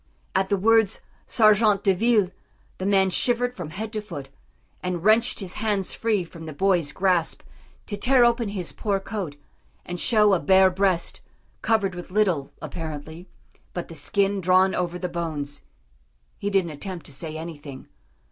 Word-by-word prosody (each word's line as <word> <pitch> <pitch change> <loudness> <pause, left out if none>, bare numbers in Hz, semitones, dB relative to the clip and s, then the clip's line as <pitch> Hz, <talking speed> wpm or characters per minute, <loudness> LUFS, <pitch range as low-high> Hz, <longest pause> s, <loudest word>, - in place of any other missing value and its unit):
"_ - - -39 0.3
At 190 - +1
the 200 - +2
words 220 +1 +3 0.3
sergents 215 -2 +4
de 195 - +4
ville 210 -1 +2 0.5
the 185 - -2
man 195 -1 +3
shivered 245 +5 +2
from 175 -9 -7
head 215 +7 -5
to 215 - -2
foot, 145 -10 -8 0.5
and 180 -2 -3
wrenched 220 +2 +3
his 185 -2 -5
hands 205 -4 0
free 215 -5 0
from 165 -1 -11
the 155 - -6
boys' 175 -3 +1
grasp 180 -1 0 0.4
to 205 - -4
tear 245 +4 +4
open 235 -2 +2
his 190 -4 -4
poor 200 -2 -1
coat, 195 -7 -5 0.5
and 175 0 -5
show 210 -1 +4
a 185 - +3
bare 190 +4 +5
breast, 185 -2 0 0.4
covered 215 -4 +1
with 175 0 -8
little, 180 -8 +1
apparently, 160 +2 -7 0.5
but 175 - -4
the - - -8
skin 195 +6 0
drawn 185 +1 +4
over 180 -1 -2
the 180 - -3
bones. 155 -5 -4 0.8
He 205 - -1
didn't 190 -4 +1
attempt 170 +2 -6
to - - -10
say 155 +2 -5
anything. 150 -4 -8
190 Hz, 165 wpm, -24 LUFS, 170-210 Hz, 0.8 s, bare